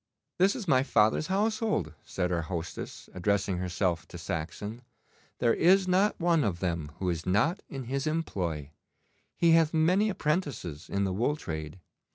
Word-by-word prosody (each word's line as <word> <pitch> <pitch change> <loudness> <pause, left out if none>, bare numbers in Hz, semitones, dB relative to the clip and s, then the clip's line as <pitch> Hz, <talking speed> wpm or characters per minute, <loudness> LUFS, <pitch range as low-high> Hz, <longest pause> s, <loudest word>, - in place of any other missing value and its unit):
'This 195 +2 +4
is 220 -7 -5
my 130 -4 +5
father's 120 +2 +2
household,' 210 - 0
said 95 -6 -2
our 85 -1 +1
hostess, 85 0 -6
addressing 100 0 0
herself 90 -1 -1
to 90 - -9
Saxon. 95 +7 -5 0.6
'There 120 -2 +3
is 185 +3 +4
not 190 +3 +2
one 170 -2 +3
of 95 -6 -1
them 85 -5 -2
who 95 - -3
is 85 -1 -4
not 130 - +2
in 135 -2 -5
his 135 +4 -2
employ. 90 - -2 0.7
He 170 -1 +4
hath 165 -1 +4
many 180 +7 +3
apprentices 145 - -2
in 100 0 0
the 95 -1 0
wool 120 +9 +1
trade. 80 - -6
110 Hz, 160 wpm, -29 LUFS, -, 0.7 s, my